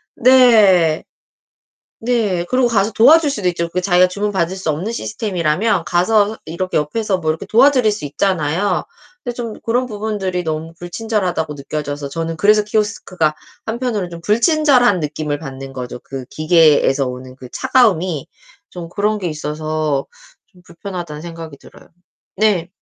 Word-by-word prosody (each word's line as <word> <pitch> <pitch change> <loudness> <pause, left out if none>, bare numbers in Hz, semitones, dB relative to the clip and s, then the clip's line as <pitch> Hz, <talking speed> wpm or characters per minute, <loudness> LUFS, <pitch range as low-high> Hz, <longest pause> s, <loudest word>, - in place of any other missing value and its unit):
네. 215 -10 +5 1.0
네. 220 -7 0
그리고 255 0 +3
가서 215 -2 +1
도와줄 295 +8 +5
수도 205 -9 -1
있죠. 170 -1 -2
그 180 +2 -2
자기가 180 0 +4
주문받을 190 -2 -2
수 185 -4 -2
없는 175 +9 -3
시스템이라면 195 -3 -1
가서 200 +6 +2
이렇게 175 +3 -4
옆에서 190 +6 0
뭐 160 -3 -1
이렇게 160 - -4
도와드릴 250 -1 +4
수 205 - -6
있잖아요. 165 +4 0 0.4
근데 245 -2 -4
좀 235 -2 -5
그런 245 +2 0
부분들이 205 -5 -3
너무 160 +1 -4
불친절하다고 180 -4 -2
느껴져서 145 0 -5
저는 165 +2 -3
그래서 210 +4 +4
키오스크가 205 -7 -1 0.3
한편으로는 225 -5 -2
좀 170 0 -8
불친절한 245 - +3
느낌을 150 -1 -3
받는 135 -2 -8
거죠. 125 -2 -6
그 135 -2 -8
기계에서 155 -3 +3
오는 130 0 -7
그 130 -2 -11
차가움이 190 - +1 0.4
좀 175 -2 -8
그런 210 +3 0
게 185 -3 -3
있어서 155 -2 -2 0.4
좀 180 - -22
불편하다는 170 -3 -7
생각이 165 -3 -8
들어요. - - -17 0.5
네. 195 -5 +1
180 Hz, 345 characters per minute, -18 LUFS, 155-215 Hz, 1.0 s, 네